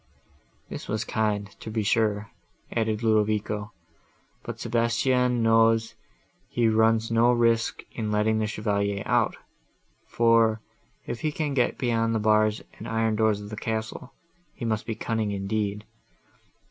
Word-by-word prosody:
"This - - -7
was 110 +1 -1
kind, 105 -2 -1
to - - -8
be 110 0 -1
sure," 105 -1 +1 0.4
added 110 -1 -1
Ludovico: 105 -1 +1 0.7
"but - - -7
Sebastian 120 +1 +1
knows 115 0 +3 0.6
he 120 -1 +1
runs 110 0 +3
no 115 +2 +4
risk 115 -2 +1
in 110 -2 -4
letting 110 +1 +2
the 110 - 0
Chevalier 100 -2 -1
out, - - +2 0.7
for, 115 -1 +3 0.5
if 120 - -5
he 155 - 0
can 150 -1 -2
get 125 -3 +1
beyond 115 -2 0
the - - +1
bars 110 0 +2 0.2
and - - -7
iron 110 -1 0
doors 110 -1 +2
of 105 +1 -9
the - - -4
castle, 110 +3 -4 0.4
he 120 - -5
must 110 -1 -2
be 110 - -2
cunning 110 -1 -2
indeed. 100 +1 -2
110 Hz, 140 wpm, -26 LUFS, 105-115 Hz, 0.7 s, no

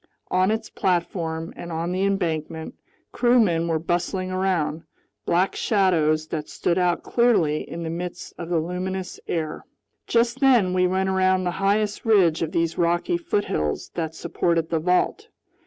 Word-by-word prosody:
On 185 +1 +3
its 220 +1 -1
platform 170 -2 -2
and 170 - -8
on 165 +2 -2
the 185 +1 -1
embankment, 165 -5 -2 0.4
crewmen 215 -10 +3
were 165 -1 +1
bustling 175 +3 -2
around, 175 -5 0 0.5
black 180 +3 +2
shadows 160 -7 +2
that 155 -2 -4
stood 175 +1 0
out 175 -1 +1
clearly 210 -11 +2
in 170 0 -5
the 160 - -3
midst 175 +1 -6
of 170 -1 -6
the 175 - +1
luminous 180 +3 -3
air. 160 -2 -3 0.4
Just 235 +2 +2
then 245 -9 +4
we 180 0 +3
went 190 +1 0
around 185 0 +2
the 180 - 0
highest 205 +1 +1
ridge 190 -8 +4
of 160 -1 -1
these 165 -2 -1
rocky 175 - +1
foothills 200 - -1
that 160 -2 -3
supported 165 0 -1
the 165 - +1
vault. 180 - +1
175 Hz, 155 wpm, -24 LUFS, 165-190 Hz, 0.5 s, then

